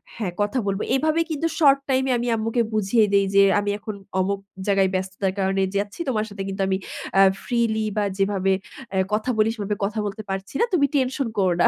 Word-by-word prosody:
হ্যাঁ 210 -6 -3
কথা 205 +6 0
বলব। 195 0 0 0.2
এভাবে 310 +4 +1
কিন্তু 315 +2 0
শর্ট 280 -3 +6
টাইম 265 0 +2
এ - - +3
আমি 240 - -2
আম্মুকে 225 +2 0
বুঝিয়ে 215 +1 +3
দেই 200 0 +4
যে 200 - +8 0.2
আমি 205 0 -2
এখন 215 0 -6 0.2
অমুক 195 +1 0 0.3
জায়গায় 195 -1 +3
ব্যস্ততার 185 0 -2
কারণে 195 0 +1
যাচ্ছি। 205 - -2
তোমার 215 -4 0
সাথে 200 -1 -6
কিন্তু 195 0 -4
আমি 190 - +1 0.4
অ্যা 195 - +7 0.2
ফ্রিলি 225 -3 0
বা 210 - +2
যেভাবে 195 -1 +1 0.4
অ্যা 190 - 0
কথা 215 +4 0
বলি 215 0 +3
সেভাবে 210 -1 -2
কথা 215 +2 -3
বলতে 210 +2 -5
পারছি 195 +2 -4
না, - - +5
তুমি 290 -6 +4
টেনশন 265 0 +1
করো 185 -3 +3
না - - +7
205 Hz, 205 wpm, -23 LUFS, 195-235 Hz, 0.4 s, যে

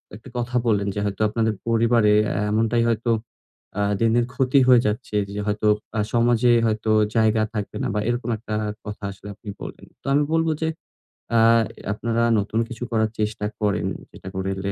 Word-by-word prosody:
একটা 110 +5 -12
কথা 120 +1 -3
বললেন 100 -3 +2
যে - - -1
হয়তো 100 0 -3
আপনাদের 110 0 0
পরিবারে 115 -2 +3 0.4
এমনটাই 115 +2 +2
হয়তো 115 +1 0 0.7
আ - - +2 0.2
দিন, 115 -1 +3
দিন 120 0 +3
ক্ষতি 130 +1 +3
হয়ে 125 -2 +7
যাচ্ছে 105 +1 -3 0.2
যে 105 - -4
হয়তো 105 +1 0 0.3
আ - - +1
সমাজে 120 0 +3
হয়তো 110 0 0 0.2
জায়গা 110 -1 +3
থাকবে 105 -2 -4
না - - 0
বা - - +1
এরকম 120 0 -2
একটা 110 0 -5 0.3
কথা 105 0 -7
আসলে 100 +1 -12
আপনি 105 +1 -10
বললেন। - - -8 0.2
তো - - -37
আমি 145 +1 +4
বলব 165 0 +2
যে 160 - +1 0.7
আ - - +6 0.4
এ - - -11
আপনারা 115 +2 -1 0.2
নতুন 105 +2 -1
কিছু 120 +1 -6
করার 110 -1 +2
চেষ্টা 105 -1 -1 0.2
করেন 100 -4 +1 0.2
যেটা - - -12
করলে 95 +1 -2
110 Hz, 180 wpm, -23 LUFS, 105-120 Hz, 0.7 s, হয়ে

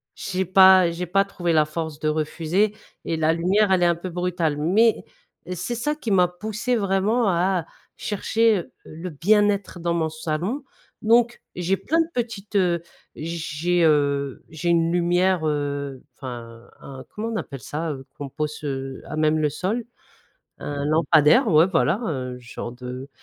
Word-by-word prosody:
j'ai 190 -1 -2
pas 185 -1 +7
j'ai 170 +2 -4
pas 195 +3 +2
trouvé 175 -4 -2
la 155 -1 +4
force 155 -1 -5
de 155 - -2
refuser 160 +6 0 0.3
et 165 - -1
la 160 0 +2
lumière 190 +5 +2
elle 185 -2 +3
est - - +5
un 170 0 +3
peu 175 +2 -6
brutale, 175 -3 -1
mais 205 +9 +3 0.5
c'est 240 +7 -3
ça 295 +6 -1
qui 270 -7 -6
m'a 180 -2 +5
poussé 215 +7 -3
vraiment 205 +2 +1
à 185 +1 +2
à 160 - -14 0.3
chercher 215 -1 +1 0.2
le 165 +3 -8
bien-être 200 +3 +2
dans 170 0 -1
mon 160 -2 0
salon, 165 - -3 0.4
donc 235 +2 +3 0.2
j'ai 180 +2 0
plein 330 +2 0
de 325 - -1
petites, 220 -4 -4
heu, 175 -3 +2 0.3
j'ai, 170 +1 -1
heu, 140 -3 +1
j'ai 165 +2 -3
une 165 -1 +3
lumière, 175 0 +2
heu, 140 -2 -2 0.2
enfin 120 -3 -9
un, 135 -1 -10
comment 220 +2 -5
on 230 - -3
appelle 135 - -5
ça? 155 +7 -3
Heu, 135 -2 -7
qu'on 145 - -5
pose, 150 +2 -4
heu, 135 -2 -4
à 155 - -6
même 155 0 +2
le 150 -1 +1
sol, 205 +10 -2 0.7
un 145 -1 -4
lampadaire, 160 - +4
ouais, 160 -3 +5
voilà, 170 +2 +1
heu, 125 -4 -4
genre 120 0 -7
de 125 +2 -8
170 Hz, 170 wpm, -23 LUFS, 150-195 Hz, 0.7 s, pas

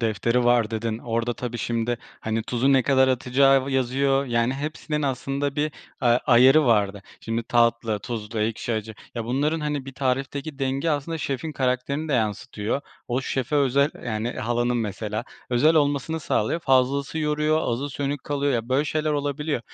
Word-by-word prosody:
"Defteri 115 +2 +1
var." 120 -2 +3
dedin. 110 0 -2
Orada 115 0 -2
tabii 120 -1 -5
şimdi, 115 +2 -1 0.2
hani, 110 0 -1
tuzu 125 +4 +1
ne 130 -2 +5
kadar 130 0 +4
atacağı 135 +2 +3
yazıyor, 135 +1 +1
yani, 120 +2 +1
hepsinin 150 +1 -3
aslında 140 +1 -2
bir 150 +1 0 0.3
a 125 - 0 0.2
ayarı 130 +5 +6
vardı. 100 -3 +2 0.2
Şimdi 115 +1 -2
tatlı, 115 -2 +2
tuzlu, 115 -1 -5
ekşi, 110 +2 -1
acı, 110 0 -3 0.2
ya, 115 -1 -3
bunların, 145 +6 0
hani, 150 -3 -2
bir 135 - -7
tarifteki 135 +3 -2
denge 135 +4 0
aslında 155 +3 -2
şefin 140 +2 -3
karakterini 135 +4 -1
de - - -1
yansıtıyor. 110 +1 -1 0.3
O 125 +2 0
şefe 135 +2 -1
özel 140 +2 +3
Yani, 115 0 -2
halanın 120 +2 0
mesela 110 +1 -3 0.3
özel 145 +7 +4
olmasını 145 +2 +1
sağlıyor, 140 +6 0
fazlası 135 +2 +2
yoruyor, 150 +1 +1
azı 135 +5 -2
sönük 140 +1 -3
kalıyor, 145 -1 0
ya, 115 0 -2
böyle 135 +3 +2
şeyler 155 0 -1
olabiliyor. 145 -1 -1
130 Hz, 160 wpm, -24 LUFS, 115-145 Hz, 0.3 s, ayarı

